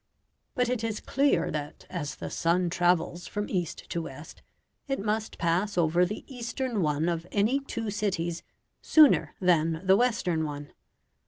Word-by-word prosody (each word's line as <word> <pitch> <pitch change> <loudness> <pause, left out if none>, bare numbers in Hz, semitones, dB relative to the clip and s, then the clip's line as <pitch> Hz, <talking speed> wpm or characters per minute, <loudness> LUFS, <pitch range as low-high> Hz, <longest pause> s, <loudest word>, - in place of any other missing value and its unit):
But 250 -1 +2
it 245 -2 -1
is 220 -2 -2
clear 280 +1 +1
that 150 -1 -5
as 145 -7 -4
the - - -7
sun 170 +1 +1
travels 175 0 +1
from 205 0 -3
east 175 -3 -3
to 170 - -1
west, 150 -1 -10 0.5
it 270 -1 -1
must 215 +2 -2
pass 180 +4 0
over 175 +1 +3
the 210 - -6
eastern 245 -3 -3
one 150 0 +1
of 170 0 -2
any 220 +7 +2
two 230 -6 -4
cities 180 -5 -2 0.4
sooner 305 -3 +5
than 165 -3 +2
the 190 +1 +6
western 195 -8 +1
one. 145 -1 -6
180 Hz, 155 wpm, -28 LUFS, 165-220 Hz, 0.5 s, the